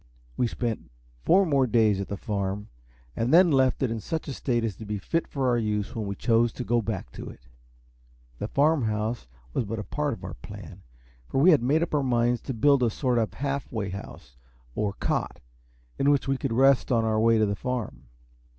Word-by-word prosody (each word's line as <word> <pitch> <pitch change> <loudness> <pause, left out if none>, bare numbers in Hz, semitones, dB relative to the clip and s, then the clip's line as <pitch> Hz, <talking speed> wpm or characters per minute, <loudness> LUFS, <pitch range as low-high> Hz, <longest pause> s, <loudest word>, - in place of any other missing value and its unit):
We 125 - +1
spent 115 - -4 0.4
four 190 +3 +5
more 140 -5 +2
days 110 -4 +3
at 100 - -5
the 100 - -4
Farm, 100 0 -3 0.5
and 115 +3 0
then 175 0 +6
left 130 -1 +2
it 125 - +1
in 115 - -2
such 160 +11 -4
a 140 - -3
state 120 -3 -1
as 110 -4 -2
to 110 - -8
be 105 0 -2
fit 165 - -2
for 135 -2 -1
our 120 -1 +2
use 105 -2 -2
when 110 -3 -3
we 100 - -3
chose 115 +1 +2
to - - -5
go 120 +3 +1
back 100 - -4
to - - -8
it. - - -13 1.0
The - - -3
Farm 145 -2 +2
House 110 - -2 0.3
was - - 0
but 115 +1 -4
a 105 - -4
part 150 +5 -2
of 105 - -10
our - - -6
plan, - - -11 0.5
for - - -2
we 175 +7 +7
had 150 - +5
made 145 +7 +2
up 170 - -4
our 145 - +2
minds 120 -2 +1
to 135 - -3
build 140 +4 +4
a 120 - +3
sort 125 +1 0
of 110 - 0
half 140 0 -3
way 110 -4 -3
house, 90 -9 -9 0.4
or 105 - -1
cot, - - -2 0.6
in 140 - +3
which 145 -1 +2
we 135 - +2
could - - -2
rest 135 +2 +4
on 115 -2 +3
our 110 -1 +1
way 115 +1 +4
to 110 - +3
the 100 0 -1
Farm. 120 - -4
120 Hz, 225 wpm, -26 LUFS, 105-135 Hz, 1.0 s, we